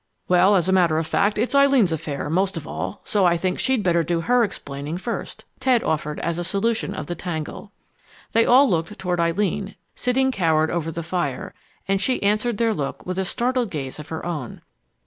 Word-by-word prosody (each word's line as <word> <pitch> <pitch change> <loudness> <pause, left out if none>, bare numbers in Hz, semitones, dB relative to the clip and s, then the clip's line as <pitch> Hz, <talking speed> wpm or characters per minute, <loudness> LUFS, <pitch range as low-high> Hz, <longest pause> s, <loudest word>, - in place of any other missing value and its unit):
"Well, 180 +3 +5
as 180 -2 +2
a - - +2
matter 175 -4 +3
of 160 - 0
fact, 200 +6 +1
it's 235 +6 0
Eileen's 275 -9 +5
affair, 150 -2 -3
most 185 +4 0
of 155 -1 -7
all, - - -5
so 205 -2 +1
I 170 0 +3
think 185 +2 -1
she'd 260 -5 +1
better 170 -2 +2
do 165 +1 -1
her 245 +6 +3
explaining 145 -5 -4
first," 230 +5 -5
Ted 255 -3 +2
offered 150 -1 -2
as 170 0 -2
a - - -2
solution 205 +6 -1
of - - -5
the 175 - -4
tangle. 175 +3 -5 0.6
They 230 - +4
all 265 +4 +6
looked 170 0 -1
toward 180 -2 -2
Eileen, 195 +4 0 0.2
sitting 265 +2 +1
cowered 160 -7 +2
over 165 -1 -2
the 170 +1 -5
fire, 160 -6 -3 0.3
and 195 0 +1
she 255 -1 0
answered 210 +2 +1
their 230 0 +2
look 140 -8 -4
with 185 +1 -3
a 190 - 0
startled 245 +3 0
gaze 140 -4 -5
of 150 - -9
her 160 - -5
own. 155 -8 -5
185 Hz, 205 wpm, -23 LUFS, 165-215 Hz, 0.6 s, all